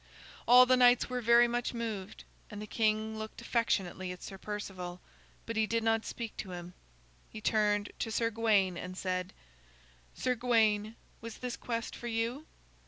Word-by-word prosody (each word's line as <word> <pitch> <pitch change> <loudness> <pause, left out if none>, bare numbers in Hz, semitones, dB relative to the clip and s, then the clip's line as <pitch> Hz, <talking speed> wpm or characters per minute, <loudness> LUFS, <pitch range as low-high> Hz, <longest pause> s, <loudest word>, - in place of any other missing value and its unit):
All 250 +1 +9
the 255 0 +4
knights 245 0 +5
were 250 0 -1
very 235 +1 +6
much 240 +1 -2
moved 220 -5 -5 0.3
and 210 - -8
the 210 - -5
king 220 0 0
looked 220 0 -7
affectionately 190 -6 -1
at 180 - -9
Sir 195 -1 -8
Perceval, 185 -4 -6 0.5
but 230 - -4
he 220 0 +2
did 230 0 0
not 225 0 +1
speak 230 -3 -5
to 185 -3 -6
him. 175 0 -8 0.6
He 215 - -8
turned 210 -1 +1
to 225 - -2
Sir 230 +1 +1
Gawain 205 -5 +2
and 185 +1 -7
said: 185 0 -2 0.8
"Sir 255 - 0
Gawain, 220 -3 +2 0.3
was 230 -1 -7
this 250 -1 -4
quest 230 -1 -4
for 240 - -7
you?" 235 +6 -2
220 Hz, 170 wpm, -32 LUFS, 205-235 Hz, 0.8 s, All